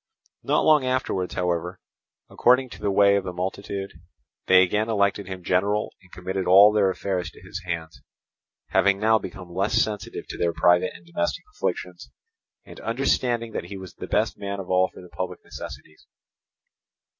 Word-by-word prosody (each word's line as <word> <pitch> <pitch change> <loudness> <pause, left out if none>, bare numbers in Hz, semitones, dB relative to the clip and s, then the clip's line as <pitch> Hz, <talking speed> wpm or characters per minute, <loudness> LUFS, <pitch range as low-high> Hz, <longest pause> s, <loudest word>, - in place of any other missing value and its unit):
Not - - +1
long 155 -3 +5
afterwards, 130 -8 -1
however, 90 0 -2 0.5
according 125 +1 +3
to - - -11
the 100 - 0
way 100 0 +5
of 100 - -1
the 95 - -4
multitude, 95 +2 -4 0.6
they 95 0 +7
again 105 +4 0
elected 100 -2 +1
him 95 -2 -7
general 100 +4 0
and 90 -2 -22
committed 95 +1 -4
all 100 +3 +8
their 100 -3 +3
affairs 95 -2 -2
to - - -17
his 90 +1 -7
hands, 80 -2 -5 0.7
having 100 -1 +3
now 110 +1 +4
become 90 -5 -9
less 100 +5 0
sensitive 105 -2 -2
to - - -7
their 85 -1 +1
private 90 +2 +4
and 85 - -14
domestic 85 0 -2
afflictions, - - -4 0.6
and - - -12
understanding 120 -1 0
that - - -4
he 100 - -7
was 95 -2 -10
the - - -8
best - - 0
man 100 0 -4
of 95 - -6
all 95 0 +3
for - - -13
the 90 - -13
public 90 +2 -6
necessities. 75 - -10
95 Hz, 170 wpm, -24 LUFS, 90-105 Hz, 0.7 s, all